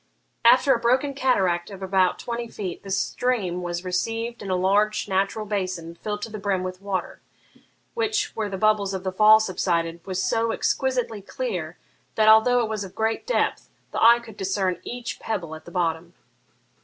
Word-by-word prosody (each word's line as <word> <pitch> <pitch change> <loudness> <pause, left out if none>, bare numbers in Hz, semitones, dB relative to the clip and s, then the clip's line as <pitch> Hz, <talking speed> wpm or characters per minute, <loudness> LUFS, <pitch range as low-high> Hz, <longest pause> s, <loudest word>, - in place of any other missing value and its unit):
After 255 +3 +6
a 235 - 0
broken 255 +4 +2
cataract 190 -10 +1
of 195 -1 -9
about 190 -1 +2
twenty 235 0 -4
feet, 190 -6 -6
the 195 - -10
stream 195 -2 -1
was 175 0 -4
received 225 +6 -2
in 200 - -6
a 185 - +1
large 205 +4 +2
natural 195 +2 0
basin 185 -5 -3
filled 210 +4 -5
to 225 - -5
the 215 - -6
brim 195 -2 -1
with 185 0 -6
water, 195 -3 -4 0.7
which, 435 -2 -1
where 215 -2 -2
the 195 - -4
bubbles 205 -1 +2
of 190 - -5
the 190 - -2
fall 215 +3 +7
subsided, 170 -5 -1
was 185 -1 -3
so 230 0 +1
exquisitely 245 -4 -1
clear - - -4 0.4
that, 215 0 +3
although 220 +3 +6
it - - -1
was 215 -2 -3
of 190 - -10
great 225 - -1
depth, - - 0 0.2
the - - -3
eye 235 +1 +8
could 230 -3 -12
discern 190 -2 -1
each 245 0 -6
pebble 175 -8 -4
at 160 0 -10
the - - -10
bottom. 170 0 -2
205 Hz, 180 wpm, -24 LUFS, 185-230 Hz, 0.7 s, eye